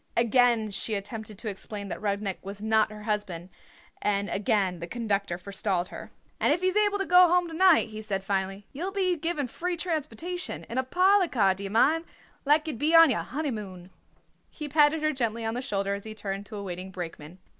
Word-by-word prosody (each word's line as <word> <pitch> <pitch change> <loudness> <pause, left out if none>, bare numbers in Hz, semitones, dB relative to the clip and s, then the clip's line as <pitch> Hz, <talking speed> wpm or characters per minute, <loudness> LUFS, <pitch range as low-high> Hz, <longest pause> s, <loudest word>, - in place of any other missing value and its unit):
Again 235 -2 +3
she 215 +2 -1
attempted 215 +1 -6
to 225 - -7
explain 200 0 -5
that - - -5
Rudnik 200 -2 -2
was 200 +2 -8
not 220 0 +3
her 210 0 -9
husband, 200 -5 -3 0.5
and 200 0 0
again 195 -3 0
the 170 - -6
conductor 200 -4 -2
forestalled 190 -1 -2
her. - - -9 0.3
"And - - +3
if 335 +4 +1
he's 370 +1 +1
able 415 -1 +3
to 390 - -2
go 360 0 +7
home 355 0 +2
to - - -8
night," 340 -7 +5
he 215 0 -7
said 195 -3 -3
finally, 195 0 -2
"ye'll 340 +8 -3
be 380 -2 +1
given 315 -3 -2
free 350 +8 -3
transportation, 335 +1 -3
in 240 - -3
a - - +1
parlour 370 +7 +4
car 200 - +3
d'ye 195 +1 -6
mind, 295 +10 +3 0.4
like 300 +2 +4
ye'd 305 -7 -4
be 310 +4 +3
on 330 -3 +8
your 225 - 0
honeymoon." 210 - -5 0.6
He 300 - -6
patted 300 +1 +3
her 310 0 +2
gently 230 -3 -2
on 225 - -1
the 245 - -3
shoulder 200 -6 -1
as 200 0 -5
he 220 0 -7
turned 200 -1 -5
to 220 - -9
a 200 - -5
waiting 185 0 -6
brakeman. 170 -2 -8
220 Hz, 205 wpm, -27 LUFS, 200-310 Hz, 0.6 s, on